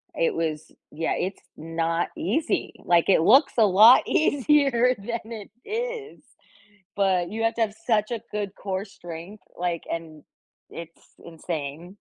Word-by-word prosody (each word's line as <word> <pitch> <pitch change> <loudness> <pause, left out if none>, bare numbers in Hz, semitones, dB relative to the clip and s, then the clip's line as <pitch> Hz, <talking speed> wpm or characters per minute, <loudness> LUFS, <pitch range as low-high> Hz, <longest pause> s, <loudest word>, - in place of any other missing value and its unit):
it 165 - +1
was, 160 -2 -3 0.2
yeah, 160 +2 -2
it's 190 +2 -4 0.2
not 165 +1 -2
easy. 315 0 -1
Like, 170 +1 +3
it 185 - +5
looks 270 - +5
a 220 - +6
lot 215 +6 +7
easier 275 -4 +3
than 230 +2 -6
it 215 -3 -8 0.2
is, 460 0 -4 0.8
but, 185 -3 +1
you 225 +1 -3
have 225 - +2
to 235 - -2
have 215 -2 +1
such 215 -1 +1
a 230 -2 -3
good 205 -2 -4
core 190 0 -4
strength, 175 0 -10
like, 175 -1 -2
and 160 -2 -6 0.5
it's 170 0 -11 0.2
insane. 165 +2 -6
195 Hz, 145 wpm, -25 LUFS, 165-235 Hz, 0.8 s, lot